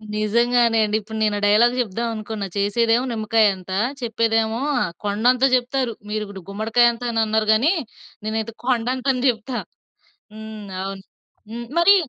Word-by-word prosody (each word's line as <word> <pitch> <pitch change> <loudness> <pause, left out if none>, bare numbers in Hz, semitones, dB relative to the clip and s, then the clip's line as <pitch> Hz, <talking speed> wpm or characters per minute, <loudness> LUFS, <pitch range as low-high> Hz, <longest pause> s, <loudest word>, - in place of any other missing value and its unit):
నిజంగానే 235 +2 +2
అండి. 210 +1 0
ఇప్పుడు 220 +1 -8
నేను 210 -1 +2
ఆ - - -8
డైలాగ్ 235 +4 +4
చెప్దాం 230 +2 -3
అనుకున్నా 215 -2 -5
చేసేదేమో 230 +4 +2
నిమ్మకాయ 220 0 +2
అంత! 185 0 -11 0.3
చెప్పేదేమో 225 -1 0 0.4
కొండంతా 245 +6 +3
చెప్తారు. 250 -1 -1 0.2
మీరు 215 0 -2
ఇప్పుడు 195 -3 -10
గుమ్మడికాయ 225 +4 +3
అంత 240 +1 -10
అని 225 -1 +1
అన్నారు 215 0 0
గాని 265 +10 +3 0.5
నేనైతే 220 +1 -2
కొండంత 255 +1 0
అని 250 0 -3
చెప్తా. 240 +2 -3 0.8
హ్మ్. 220 -1 -9 0.2
అవును. 195 0 -6 0.5
హ్మ్. 235 +1 -6
మరీ 395 +4 +7
225 Hz, 145 wpm, -22 LUFS, 215-240 Hz, 0.8 s, మరీ